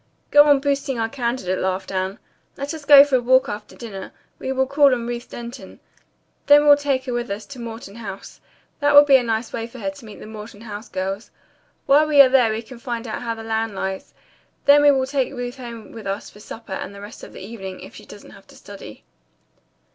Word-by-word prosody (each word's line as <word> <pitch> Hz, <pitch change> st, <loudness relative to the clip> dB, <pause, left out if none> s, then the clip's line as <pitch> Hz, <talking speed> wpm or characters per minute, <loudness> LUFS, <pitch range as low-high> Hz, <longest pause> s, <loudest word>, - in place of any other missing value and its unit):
"Go 290 Hz, 0 st, +8 dB
on 290 Hz, -2 st, +5 dB
boosting 280 Hz, -2 st, -1 dB
our 225 Hz, 0 st, 0 dB
candidate," 235 Hz, -7 st, -2 dB
laughed 190 Hz, +1 st, -2 dB
Anne. 190 Hz, +1 st, -2 dB, 0.4 s
"Let 280 Hz, +3 st, -4 dB
us 310 Hz, -2 st, -9 dB
go 280 Hz, -1 st, +10 dB
for 285 Hz, -2 st, +2 dB
a -, -, -2 dB
walk 260 Hz, +2 st, +4 dB
after 210 Hz, 0 st, -7 dB
dinner. 200 Hz, -5 st, -8 dB, 0.3 s
We 260 Hz, -, -4 dB
will 265 Hz, 0 st, +1 dB
call 280 Hz, 0 st, +4 dB
on 235 Hz, -1 st, -5 dB
Ruth 240 Hz, 0 st, -5 dB
Denton. 240 Hz, +1 st, -9 dB, 0.7 s
Then 290 Hz, +1 st, +7 dB
we'll 290 Hz, -1 st, +8 dB
take 280 Hz, -2 st, -1 dB
her 250 Hz, -, -3 dB
with 240 Hz, 0 st, -3 dB
us 200 Hz, +2 st, -5 dB
to 280 Hz, -3 st, -11 dB
Morton 225 Hz, -3 st, -8 dB
House. 200 Hz, -4 st, -9 dB, 0.4 s
That 290 Hz, -1 st, +2 dB
will 290 Hz, -, +11 dB
be 275 Hz, -2 st, +7 dB
a -, -, 0 dB
nice 225 Hz, -1 st, -2 dB
way 230 Hz, 0 st, -4 dB
for 250 Hz, +2 st, -13 dB
her 290 Hz, +4 st, -3 dB
to 285 Hz, -5 st, -14 dB
meet 215 Hz, -, -11 dB
the -, -, -10 dB
Morton 215 Hz, -1 st, -10 dB
House 215 Hz, 0 st, -8 dB
girls. 195 Hz, +3 st, -4 dB, 0.6 s
While 295 Hz, +3 st, +4 dB
we 295 Hz, -2 st, +3 dB
are 275 Hz, -2 st, +9 dB
there 255 Hz, -4 st, +4 dB
we 220 Hz, +1 st, -4 dB
can 240 Hz, +1 st, -12 dB
find 235 Hz, -1 st, -5 dB
out 220 Hz, -, -5 dB
how 230 Hz, -1 st, -3 dB
the 225 Hz, -, -9 dB
land 225 Hz, -1 st, -2 dB
lies. 190 Hz, 0 st, -5 dB, 0.5 s
Then 285 Hz, +1 st, +7 dB
we 290 Hz, -, +6 dB
will 265 Hz, -2 st, +3 dB
take 270 Hz, 0 st, -1 dB
Ruth 245 Hz, +1 st, -5 dB
home 235 Hz, -3 st, -9 dB
with 220 Hz, -3 st, -9 dB
us 195 Hz, +2 st, -4 dB
for 210 Hz, -, -16 dB
supper 220 Hz, -1 st, -9 dB
and 200 Hz, -, -6 dB
the 200 Hz, -, -10 dB
rest 205 Hz, -, -11 dB
of -, -, -10 dB
the -, -, -10 dB
evening, 195 Hz, -4 st, -8 dB
if -, -, -11 dB
she -, -, -13 dB
doesn't -, -, -13 dB
have -, -, -17 dB
to -, -, -17 dB
study." -, -, -12 dB
235 Hz, 235 wpm, -21 LUFS, 215-275 Hz, 0.7 s, will